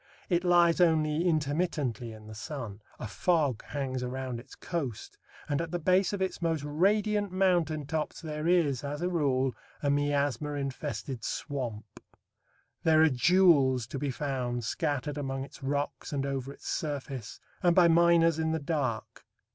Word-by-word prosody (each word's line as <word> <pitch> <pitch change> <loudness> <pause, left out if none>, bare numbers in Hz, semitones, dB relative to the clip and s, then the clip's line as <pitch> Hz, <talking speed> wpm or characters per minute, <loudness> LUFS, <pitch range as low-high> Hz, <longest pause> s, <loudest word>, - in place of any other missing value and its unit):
It 175 -1 +2
lies 175 -1 +4
only 160 -1 +3
intermittently 145 -7 -1
in 110 -1 -12
the 110 - -9
sun. 115 -4 -6 0.2
A - - -6
fog 145 - +1
hangs 130 -3 -3
around 125 -1 -4
its 130 +3 -13
coast, 140 - -5 0.3
and 145 +1 0
at 165 - -4
the 175 - -2
base 185 +3 +2
of 200 -2 -1
its 190 - -3
most 165 -3 0
radiant 205 +6 +1
mountain 175 -5 +1
tops 155 +1 -3
there 155 -1 -4
is, 160 -8 +2
as 145 +3 -4
a 180 - +1
rule, 135 -6 +1 0.3
a 140 - +2
miasma 145 0 0
infested 135 -3 -4
swamp. 115 -7 -4 0.8
There 160 -1 +5
are 160 - +6
jewels 140 -4 +4
to 125 +5 -6
be 145 0 -1
found 125 -3 -2
scattered 145 +5 -2
among 135 -1 -3
its 140 - -12
rocks 140 0 -2
and 140 -2 -1
over 135 -1 -3
its - - -12
surface, 140 - -4 0.2
and 175 -1 +4
by 180 -2 +7
miners 165 -1 +4
in 160 0 0
the 160 - 0
dark. 140 -7 -3
145 Hz, 160 wpm, -29 LUFS, 130-170 Hz, 0.8 s, by